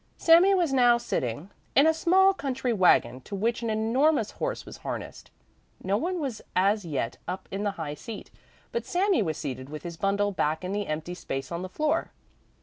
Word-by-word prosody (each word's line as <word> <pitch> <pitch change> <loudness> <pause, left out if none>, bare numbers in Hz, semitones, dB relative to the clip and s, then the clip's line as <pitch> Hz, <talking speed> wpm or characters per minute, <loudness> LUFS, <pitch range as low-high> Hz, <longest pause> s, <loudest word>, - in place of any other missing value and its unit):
Sami 345 +4 +6
was 340 -7 +1
now 245 -2 +5
sitting 145 - -3 0.2
in 280 - +6
a 320 - +5
small 380 +4 +4
country 265 -7 -2
wagon 130 - +3
to 200 - -7
which 230 +4 0
an 230 - -2
enormous 225 +3 +2
horse - - -4
was - - -10
harnessed. - - -7 0.5
No 195 +2 +1
one 350 - -1
was 260 -8 -4
as 200 +3 +2
yet 140 -8 -3
up 180 +2 -5
in 195 - -3
the 205 - 0
high 155 -3 -4
seat, 220 +8 -9 0.4
but 475 - -2
Sami 370 - +2
was 160 -6 -2
seated 130 -2 -5
with 150 0 -7
his 170 -2 -7
bundle 200 +2 +1
back 155 -3 -1
in 185 - -3
the 205 0 -2
empty 155 +3 -3
space 135 -6 -5
on 170 +1 -3
the 185 - -5
floor. 310 - -1
210 Hz, 195 wpm, -27 LUFS, -, 0.5 s, Sami